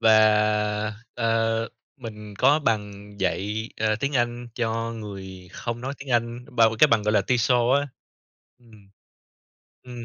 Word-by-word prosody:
Và, 105 Hz, -1 st, +3 dB, 0.2 s
ờ, 115 Hz, -1 st, 0 dB, 0.3 s
mình 105 Hz, -5 st, -9 dB
có 140 Hz, +4 st, +5 dB
bằng 105 Hz, -6 st, -3 dB
dạy, 105 Hz, +4 st, -1 dB
ờ, 110 Hz, -1 st, +2 dB
tiếng 140 Hz, +1 st, -1 dB
Anh 120 Hz, 0 st, -1 dB
cho 115 Hz, -1 st, -2 dB
người 95 Hz, -4 st, -9 dB
không 120 Hz, 0 st, -5 dB
nói 135 Hz, +3 st, -4 dB
tiếng 140 Hz, -1 st, -9 dB
Anh, 120 Hz, 0 st, 0 dB
bà 115 Hz, -, +7 dB
cái -, -, +7 dB
bằng 115 Hz, -2 st, +3 dB
gọi 105 Hz, +1 st, +1 dB
là -, -, +4 dB
TESOL 125 Hz, +1 st, +2 dB
á. 145 Hz, -, -5 dB, 0.7 s
Ừm. 110 Hz, -5 st, -20 dB, 0.9 s
Ừm. 120 Hz, -2 st, -9 dB
115 Hz, 145 wpm, -24 LUFS, 105-120 Hz, 0.9 s, bà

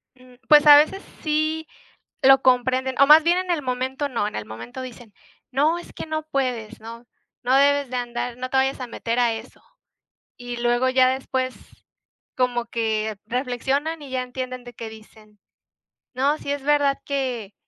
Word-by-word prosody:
Mm, 255 Hz, -1 st, -19 dB
pues, 300 Hz, -1 st, +7 dB
a 290 Hz, -1 st, +11 dB
veces 315 Hz, +6 st, +2 dB, 0.2 s
sí 310 Hz, +1 st, -1 dB, 0.5 s
lo 270 Hz, 0 st, +6 dB
comprenden 260 Hz, +1 st, +2 dB
o 275 Hz, -, +7 dB
más 305 Hz, +2 st, +8 dB
bien 345 Hz, +2 st, +3 dB
en 370 Hz, -1 st, -3 dB
el 335 Hz, -3 st, 0 dB
momento, 260 Hz, +2 st, -2 dB
no. 230 Hz, -5 st, -1 dB
En -, -, -7 dB
el 105 Hz, -, -4 dB
momento 115 Hz, -, -9 dB
dicen: 245 Hz, -4 st, -10 dB, 0.4 s
"No 295 Hz, +6 st, +2 dB
es -, -, -13 dB
que -, -, -7 dB
no 315 Hz, 0 st, -3 dB
puedes, 250 Hz, -7 st, -3 dB
¿no?, 230 Hz, +2 st, -10 dB, 0.4 s
no 255 Hz, +2 st, +2 dB
debes 285 Hz, 0 st, +3 dB
de 255 Hz, -, -5 dB
andar 240 Hz, 0 st, -4 dB
no 255 Hz, 0 st, -5 dB
te 265 Hz, -, 0 dB
vayas 265 Hz, +1 st, +1 dB
a 250 Hz, -, -4 dB
meter 230 Hz, +1 st, -3 dB
a 240 Hz, -2 st, +2 dB
eso", 225 Hz, +3 st, -10 dB, 0.8 s
y 245 Hz, -1 st, -7 dB
luego 240 Hz, +2 st, +1 dB
ya 255 Hz, 0 st, +4 dB
después 260 Hz, 0 st, -2 dB, 0.8 s
como 245 Hz, -2 st, 0 dB
que 220 Hz, -2 st, -2 dB
reflexionan 270 Hz, +6 st, -2 dB
y 280 Hz, -, -10 dB
ya 260 Hz, -1 st, -1 dB
entienden 255 Hz, 0 st, -6 dB
de 245 Hz, -1 st, -11 dB
qué 225 Hz, -, -7 dB
dicen: 215 Hz, -1 st, -17 dB, 0.8 s
"No, 280 Hz, +4 st, +1 dB
si 285 Hz, -, -5 dB
es 285 Hz, -1 st, -3 dB
verdad 285 Hz, -1 st, +2 dB
que 255 Hz, -7 st, -3 dB
255 Hz, 180 wpm, -23 LUFS, 240-280 Hz, 0.8 s, a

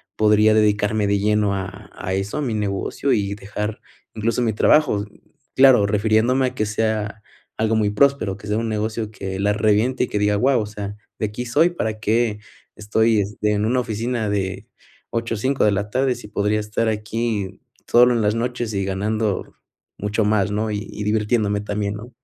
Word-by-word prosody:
podría 105 Hz, 0 st, +4 dB
dedicarme 105 Hz, 0 st, +2 dB
de 100 Hz, 0 st, +2 dB
lleno 105 Hz, 0 st, +2 dB
a 95 Hz, 0 st, -7 dB
a 95 Hz, -, -4 dB
eso, 95 Hz, +8 st, -3 dB
a -, -, -1 dB
mi 125 Hz, -6 st, -2 dB
negocio, 105 Hz, +6 st, -1 dB
y 100 Hz, -1 st, 0 dB
dejar 105 Hz, +1 st, -5 dB, 0.4 s
incluso 115 Hz, +2 st, 0 dB
mi 110 Hz, -2 st, +1 dB
trabajo, 115 Hz, -3 st, +3 dB, 0.5 s
claro, 130 Hz, -6 st, +6 dB
refiriéndome 110 Hz, +5 st, +2 dB
a 125 Hz, -, -6 dB
que 110 Hz, -, 0 dB
sea 105 Hz, -1 st, -2 dB, 0.4 s
algo 110 Hz, 0 st, +1 dB
muy 105 Hz, -2 st, +1 dB
próspero, 110 Hz, -4 st, +2 dB
que 105 Hz, -, -11 dB
sea 105 Hz, -, 0 dB
un 115 Hz, 0 st, -1 dB
negocio 110 Hz, 0 st, -2 dB
que 95 Hz, -2 st, -5 dB
la 100 Hz, +1 st, +2 dB
reviente 110 Hz, +4 st, +2 dB
y -, -, -12 dB
que -, -, -2 dB
diga: 105 Hz, 0 st, +2 dB
"Guau", 125 Hz, +2 st, +3 dB
o -, -, -3 dB
sea, 105 Hz, -1 st, -6 dB, 0.2 s
"de 110 Hz, -, 0 dB
aquí 105 Hz, +4 st, -5 dB
soy, 145 Hz, +8 st, +3 dB
¿para 110 Hz, -10 st, -3 dB
qué 110 Hz, 0 st, +1 dB, 0.4 s
estoy 110 Hz, 0 st, +2 dB, 0.2 s
en 105 Hz, 0 st, +2 dB
una 125 Hz, +3 st, +2 dB
oficina 115 Hz, -1 st, -2 dB
de 95 Hz, 0 st, -2 dB, 0.5 s
8 115 Hz, 0 st, -2 dB
a -, -, -4 dB
5, 130 Hz, +5 st, 0 dB
de 105 Hz, -, +4 dB
la 100 Hz, +1 st, -2 dB
tarde, 130 Hz, +1 st, +1 dB
si 120 Hz, -3 st, -10 dB
podría 105 Hz, +1 st, 0 dB
estar 105 Hz, +2 st, -1 dB
aquí 105 Hz, -2 st, -3 dB, 0.3 s
solo 125 Hz, +1 st, +6 dB
en 115 Hz, -, +1 dB
las 105 Hz, +1 st, +1 dB
noches 120 Hz, -2 st, -2 dB
y 100 Hz, -, -1 dB
ganando 105 Hz, +2 st, -2 dB, 0.4 s
mucho 105 Hz, +2 st, -1 dB
más?". 105 Hz, -1 st, +2 dB
¿No? 105 Hz, +1 st, -1 dB
Y 105 Hz, -, -2 dB
y 105 Hz, -, -5 dB
divirtiéndome 105 Hz, -1 st, +1 dB
también, 105 Hz, -1 st, -2 dB
¿no? 115 Hz, +4 st, -10 dB
105 Hz, 190 wpm, -21 LUFS, 105-115 Hz, 0.5 s, claro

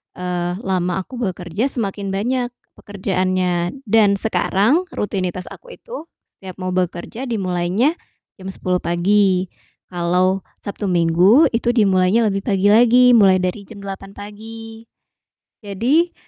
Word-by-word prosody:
eee, 180 Hz, -1 st, -3 dB
lama 185 Hz, 0 st, -1 dB
aku 250 Hz, +5 st, -10 dB
bekerja, 190 Hz, +1 st, -2 dB
semakin 200 Hz, -6 st, -3 dB
banyak 245 Hz, +5 st, -1 dB, 0.3 s
pekerjaannya. 185 Hz, -2 st, -1 dB
Dan 210 Hz, -3 st, +3 dB
sekarang 220 Hz, -, +1 dB
rutinitas 185 Hz, -3 st, -3 dB
aku -, -, -12 dB
itu 470 Hz, -9 st, -9 dB, 0.2 s
setiap 190 Hz, -1 st, -11 dB
mau 185 Hz, -1 st, -4 dB
bekerja 185 Hz, +7 st, -3 dB
dimulainya 195 Hz, -, 0 dB, 0.4 s
jam 190 Hz, -, -9 dB
10:00 185 Hz, -1 st, -2 dB
pagi, 185 Hz, +1 st, +1 dB, 0.4 s
kalau 180 Hz, +2 st, +1 dB, 0.2 s
Sabtu 200 Hz, 0 st, -4 dB
Minggu 180 Hz, -, +4 dB
itu 240 Hz, +1 st, 0 dB
dimulainya 195 Hz, 0 st, +3 dB
lebih 200 Hz, -3 st, 0 dB
pagi 200 Hz, -1 st, +1 dB
lagi, 245 Hz, +3 st, +6 dB
mulai 200 Hz, -5 st, +6 dB
dari 185 Hz, +2 st, -2 dB
jam 200 Hz, -3 st, -11 dB
8:00 195 Hz, 0 st, -8 dB
pagi. 225 Hz, +2 st, -10 dB, 0.7 s
Jadi 245 Hz, -, 0 dB
195 Hz, 120 wpm, -19 LUFS, 185-225 Hz, 0.7 s, lagi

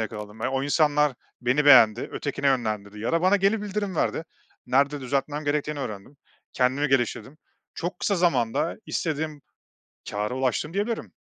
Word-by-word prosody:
yakaladım. 105 Hz, 0 st, -6 dB
E, -, -, +1 dB
o 135 Hz, 0 st, -1 dB
insanlar 150 Hz, -1 st, +2 dB, 0.3 s
beni 130 Hz, +4 st, +1 dB
beğendi, 120 Hz, -5 st, +6 dB
ötekine 140 Hz, -1 st, -3 dB
yönlendirdi 110 Hz, -6 st, -1 dB
ya 115 Hz, -, -2 dB
da 165 Hz, +1 st, +2 dB
bana 190 Hz, +2 st, +5 dB
geri 200 Hz, +2 st, +1 dB
bildirim 205 Hz, -2 st, -3 dB
verdi, 160 Hz, -, 0 dB, 0.4 s
nerede 140 Hz, +3 st, +2 dB
düzeltmem 140 Hz, +3 st, -2 dB
gerektiğini 150 Hz, +1 st, -1 dB
öğrendim, 110 Hz, +2 st, -7 dB, 0.4 s
kendimi 130 Hz, +3 st, +1 dB
geliştirdim. 135 Hz, +2 st, -1 dB, 0.4 s
Çok 175 Hz, +1 st, -4 dB
kısa 200 Hz, -, 0 dB
zamanda 150 Hz, -4 st, +1 dB
istediğim 155 Hz, -2 st, -3 dB, 0.7 s
kâra 105 Hz, +4 st, -2 dB
ulaştım, 135 Hz, +5 st, -1 dB
diyebilirim. 215 Hz, +3 st, -2 dB
140 Hz, 145 wpm, -25 LUFS, 125-160 Hz, 0.7 s, beğendi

